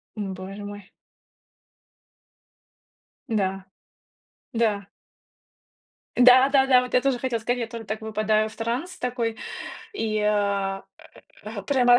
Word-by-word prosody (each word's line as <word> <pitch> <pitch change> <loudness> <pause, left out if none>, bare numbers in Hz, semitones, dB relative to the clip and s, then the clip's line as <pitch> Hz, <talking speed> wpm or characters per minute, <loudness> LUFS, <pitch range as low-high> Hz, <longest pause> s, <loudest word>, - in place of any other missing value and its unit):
Ну 200 -3 -3
боже 190 +2 -7
мой. 205 -1 -9 2.4
Да. 195 -4 -1 0.9
Да. 210 -4 +1 1.3
Да-да-да. 260 +1 +7
Вот 250 0 -6
я 250 - +5
тоже 270 -2 +1
хотела 240 -2 -1
сказать, 245 +3 -1
я 230 - -2
только 230 -1 -7
так 215 +1 -3
выпадаю 215 0 +1
в - - -14
транс 245 +11 -3
такой, 240 -3 -2 0.6
и, 220 - -1
а, 200 -2 +1 0.6
а, - - -6
прямо 245 -3 +5
225 Hz, 110 wpm, -25 LUFS, 205-250 Hz, 2.4 s, Да-да-да